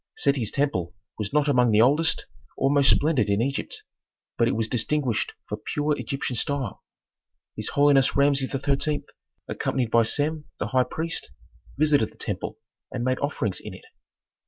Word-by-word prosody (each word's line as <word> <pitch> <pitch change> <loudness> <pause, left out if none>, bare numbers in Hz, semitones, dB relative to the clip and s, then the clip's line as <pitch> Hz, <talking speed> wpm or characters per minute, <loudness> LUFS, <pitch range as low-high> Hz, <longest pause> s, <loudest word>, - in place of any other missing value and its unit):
Seti's 135 -6 +1
temple 105 - -1 0.2
was 105 -2 -3
not 150 0 +2
among 125 -4 +4
the 110 0 +5
oldest 150 +7 +3 0.3
or 135 - +2
most 140 -2 +5
splendid 145 -7 +3
in 100 0 +2
Egypt, 135 +4 -2 0.5
but 115 - +2
it - - 0
was 110 0 0
distinguished 125 +1 0
for - - -4
pure 150 0 0
Egyptian 135 -3 -3
style. 135 -2 -2 0.7
His - - -3
holiness 140 -2 +4
Rameses 140 -1 +3
XIII., 140 +2 0 0.4
accompanied 125 -4 -1
by 115 - +5
Sem 150 +6 -1
the - - -3
high 130 -1 +3
priest, 165 +6 -4 0.5
visited 145 -6 +3
the - - -23
temple - - -4 0.3
and 120 - -3
made 130 +1 0
offerings 140 -8 -2
in - - -8
it. - - -14
135 Hz, 160 wpm, -25 LUFS, 120-145 Hz, 0.7 s, the